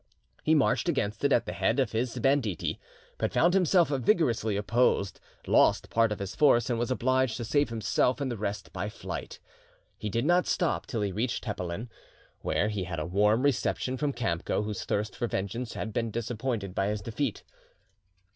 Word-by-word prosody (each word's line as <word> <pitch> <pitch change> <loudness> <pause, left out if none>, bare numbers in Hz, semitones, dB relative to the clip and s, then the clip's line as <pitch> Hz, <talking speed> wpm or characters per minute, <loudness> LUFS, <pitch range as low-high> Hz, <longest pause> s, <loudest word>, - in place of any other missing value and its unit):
He 160 - +3
marched 150 +4 +2
against 105 -9 -1
it - - +3
at - - +3
the - - -4
head - - +1
of - - +1
his 115 +2 -2
banditti, 135 - 0 0.4
but - - 0
found 175 +2 +3
himself 180 -4 +4
vigorously 125 - +1
opposed, 105 -1 +1 0.3
lost - - +3
part 115 -1 +3
of 105 - -2
his 100 0 -5
force, 130 -4 +4
and 115 - 0
was 120 - -1
obliged 130 -2 +1
to 120 - -4
save 145 +5 +2
himself 115 - +1
and 135 -3 -2
the - - -2
rest 100 -1 -4
by - - -3
flight. - - -6 0.6
He 105 - -3
did 115 +5 -1
not 175 +2 +3
stop 175 - 0
till 115 - -2
he 100 - -1
reached 115 +6 -2
Tepelen, 100 0 -4 0.5
where 105 - 0
he 100 -4 -2
had 85 -2 -5
a 75 - -2
warm 105 +7 +2
reception 130 -2 0
from 140 +2 -1
Kamco, 105 -5 -1
whose 105 -1 -4
thirst 105 0 -1
for 120 - -1
vengeance 115 +5 -3
had 110 - -4
been 115 +1 -1
disappointed 115 -3 -3
by 95 +1 0
his 105 -1 -2
defeat. 115 +2 -3
115 Hz, 185 wpm, -28 LUFS, 105-130 Hz, 0.6 s, himself